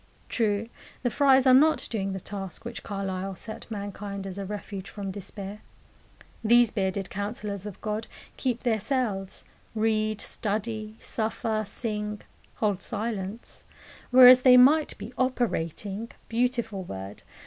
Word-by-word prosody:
True, 215 -2 0 0.4
the 245 - +1
friars 270 -1 +5
are 260 - +7
not 305 +5 +5
doing 195 -4 -1
the 190 - -3
task 195 +2 -7
which 235 0 -6
Carlyle 195 -1 -4
set 220 +6 -7
mankind 200 -1 -5
as 195 0 -6
a 200 - -3
refuge 200 -1 -6
from 200 -2 -5
despair. 200 +1 -7 0.8
These 235 0 +5
"bearded 195 -2 -2
counsellors 205 0 -4
of 205 - -8
God" 215 0 -3 0.3
keep 250 -3 -2
their 225 -3 +2
cells, 210 -5 -1 0.3
read, 215 -1 +1
study, 215 +1 -3
suffer, 220 -1 -2
sing, 210 -1 -4 0.3
hold 205 -3 0
silence; 215 -1 -3 0.5
whereas 255 0 +9
they 255 -1 +8
might 295 +5 +5
be 215 +5 -8
"operating" 225 - -1 0.2
beautiful 235 -3 0
word! 95 - -7
215 Hz, 130 wpm, -27 LUFS, 195-235 Hz, 0.8 s, whereas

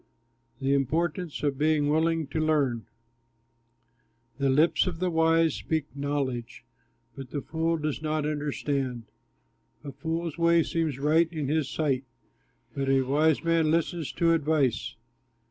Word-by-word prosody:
THE 135 0 +1
IMPORTANCE 155 +5 -1
OF 140 -2 0
BEING 155 -1 +2
WILLING 160 +1 +1
TO 145 +3 -4
LEARN 145 -7 +1 1.5
The 140 0 +2
lips 155 +7 +3
of 175 -3 -3
the 180 +1 -1
wise 165 -1 +3
speak 155 -3 -3
knowledge, 135 -5 -3 0.5
But 135 -2 -8
the 145 +1 -4
fool 165 +2 -1
does 155 -1 -3
not 155 -1 -1
understand. 145 -4 -2 0.8
A 140 - -6
fool's 160 +4 -4
way 170 0 +4
seems 160 -5 -1
right 160 +4 +2
in 155 -5 -3
his 155 -2 0
sight, 140 -5 0 0.7
But 135 -1 -2
a 135 -1 +3
wise 150 +4 +2
man 165 -2 +2
listens 165 -1 0
to 165 -1 +3
advice. 140 -8 0
150 Hz, 135 wpm, -27 LUFS, 140-165 Hz, 1.5 s, way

